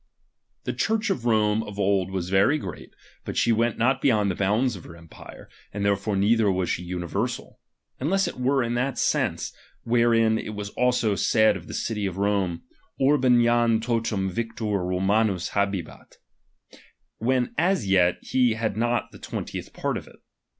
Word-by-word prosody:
The - - -3
Church 220 -1 0
of 120 -10 -3
Rome 110 -2 +2
of 105 -2 -8
old 95 -2 +1
was 95 -1 -4
very 100 +10 +4
great, 95 - -8 0.3
but - - -6
she 120 - +3
went 115 0 +1
not 130 +4 +1
beyond 105 -7 +2
the - - -4
bounds 110 +6 +1
of 90 - -10
her 85 - -11
empire, 85 -1 -13 0.2
and 100 0 -3
therefore 100 +1 0
neither 105 +1 +3
was 90 -2 -1
she - - -2
universal; 90 -1 -4 0.4
unless 190 +8 +1
it - - -6
were 130 +1 +2
in 120 0 -2
that 125 +2 -1
sense, - - 0 0.3
wherein 115 -1 +3
it 105 - -6
was 100 -1 -5
also 125 -4 +1
said 110 +1 +3
of 90 -3 -9
the - - -6
city 105 -3 -2
of 95 -1 -6
Rome, 100 -4 0 0.4
Orhem 130 -3 +4
jam 120 -1 +3
totum 110 -4 -1
victor 115 +3 -4 0.2
Romamts 95 +1 +1
hahehat; 100 -3 -3 1.0
when 125 +2 0
as 170 - +1
yet 90 -2 +3
he 125 -3 +2
had 110 -1 -2
not 120 +1 -1
the 100 - -13
twentieth - - -6
part - - -2
of - - -9
it. - - -16
110 Hz, 170 wpm, -25 LUFS, 95-120 Hz, 1.0 s, very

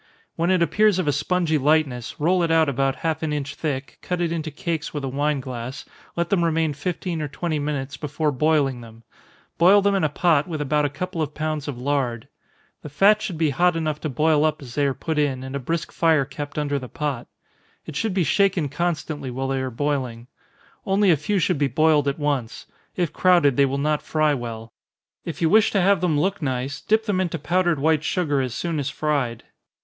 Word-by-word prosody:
When 170 +2 0
it 185 -2 +3
appears 210 +2 +3
of 185 -4 -1
a - - +4
spongy 155 +2 0
lightness, 140 -4 0
roll 175 +4 +2
it 170 - +1
out 165 -1 +4
about 135 0 0
half 160 -1 0
an 160 -2 -2
inch 145 -1 -3
thick, 135 -4 -4
cut 180 -1 -3
it 170 -1 0
into 160 -2 -3
cakes 160 -1 -4
with 145 - -3
a - - -2
wine 145 +2 0
glass, 125 0 -6 0.3
let 170 0 -2
them 185 -4 +3
remain 160 -2 +1
fifteen 170 +2 -3
or 150 - -2
twenty 155 +2 -3
minutes 145 -2 -3
before 150 0 -1
boiling 140 -2 +1
them 115 0 -14 0.6
boil 185 +4 +7
them 200 0 +2
in 195 - +1
a 155 - +2
pot, 160 -3 +2
with 160 -3 -4
about 150 +1 +1
a - - 0
couple 170 +4 -4
of 150 -1 -3
pounds 155 -1 -3
of 140 -4 -4
lard. 125 -3 -1 0.5
The 150 - -8
fat 200 +9 +4
should 180 -6 -4
be 155 -2 +2
hot 175 +5 +2
enough 155 -2 -2
to 155 - -2
boil 150 +2 +2
up 155 0 +1
as 120 -2 -10
they 145 0 +1
are 135 - -1
put 160 -2 -2
in, 135 -3 0
and 130 +1 -6
a - - -1
brisk 165 +5 -3
fire 160 -4 +3
kept 145 +1 -7
under 145 -1 0
the 125 -2 -9
pot. 145 -6 -3 0.6
It 155 - -8
should 215 +4 -1
be 185 - +2
shaken 180 -1 +2
constantly 150 -3 -2
while 135 +2 -3
they 135 -1 -1
are 130 - -2
boiling. 125 -3 -2 0.6
Only 195 0 +3
a - - +5
few 155 +8 -1
should 180 -3 +1
be 145 - +2
boiled 150 +2 +3
at 140 - 0
once 145 -6 -2 0.3
if 175 -4 -1
crowded, 175 -8 +4
they 140 +1 +4
will 135 +1 -2
not 150 +1 0
fry 155 -1 +1
well. 115 -3 -6 0.5
If 170 0 -4
you 160 - +4
wish 215 +1 +5
to 200 - +1
have 195 0 +3
them 160 -5 +1
look 195 +4 0
nice, 135 0 -3
dip 220 +1 +1
them 195 -4 0
into 175 -2 -2
powdered 175 +2 +1
white 155 +2 +2
sugar 150 -6 0
as 125 -3 -3
soon 165 -3 -2
as 140 -1 -2
fried. 140 -6 -1
150 Hz, 220 wpm, -23 LUFS, 140-170 Hz, 0.6 s, boil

